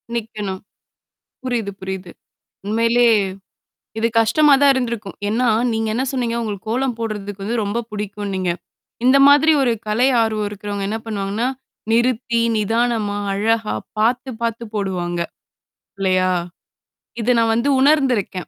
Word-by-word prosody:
நிக்கணும். 210 -4 -4 0.8
புரியுது, 235 -5 -2
புரியுது. 190 -2 -5 0.6
உண்மையிலே 230 +3 +3 0.9
இது 225 +1 +2
கஷ்டமா 285 +7 +4
தான் 285 -1 +7
இருந்திருக்கும். 235 -6 -3
ஏன்னா, 235 +4 +1 0.2
நீங்க 225 0 -1
என்ன 245 +4 0
சொன்னீங்க? 245 -3 -1
உங்களுக்கு 215 -2 -5
கோலம் 250 +1 0
போடுறதுக்கு 205 -3 -5
வந்து 225 +4 -2
ரொம்ப 205 +3 -2
புடிக்கும்ன்னீங்க. 200 -3 -3 0.5
இந்த 260 +2 +6
மாதிரி 290 +3 +6
ஒரு 255 -3 +2 0.2
கலை 225 +5 +2
ஆர்வம் 215 -2 0
இருக்கிறவங்க 205 -1 -5
என்ன 220 - -2
பண்ணுவாங்கன்னா? 210 +2 -2 0.4
நிறுத்தி 235 0 +1 0.2
நிதானமா 220 -1 0 0.2
அழகா 220 - 0 0.2
பார்த்து, 245 +4 +1
பார்த்து 230 0 -2
போடுவாங்க. 180 -4 -2 0.8
இல்லையா? 185 -1 +2 0.9
இத 245 +3 +2
நான் 225 -1 +3
வந்து 235 +5 +1
உணர்ந்திருக்கேன். 260 - +2
225 Hz, 120 wpm, -20 LUFS, 205-240 Hz, 0.9 s, தான்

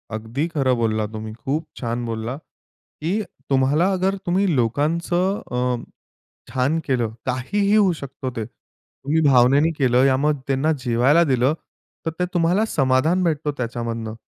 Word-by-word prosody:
अगदी 115 +8 -3
खरं 135 -6 +1
बोलला 110 -2 0
तुम्ही. 110 0 -7
खूप 140 +8 -3
छान 120 0 -3
बोलला. 115 +2 -3 0.7
की 185 +8 0 0.3
तुम्हाला 140 +7 +3
अगर, 190 +1 0
तुम्ही 190 +3 +2
लोकांचं 170 - 0
अ, 125 -1 -1 0.7
छान 130 +5 +1
केलं, 120 -5 0
काहीही 200 - 0
होऊ 205 -4 +5
शकतो 135 -1 -5
ते. 110 - -2
तुम्ही 145 +6 -5
भावनेने 135 +5 +5
केलं, 125 -2 +3
या 130 -1 +3
मग 145 +1 +1
त्यांना 140 +3 +1
जेवायला 125 +8 +4
दिलं, 130 -2 +2 0.5
तर 165 - 0
ते 180 - +2
तुम्हाला 175 +5 +2
समाधान 135 +6 +2
भेटतो 155 -3 0
त्याच्यामधनं. 115 -2 -4
135 Hz, 140 wpm, -22 LUFS, 120-165 Hz, 0.7 s, होऊ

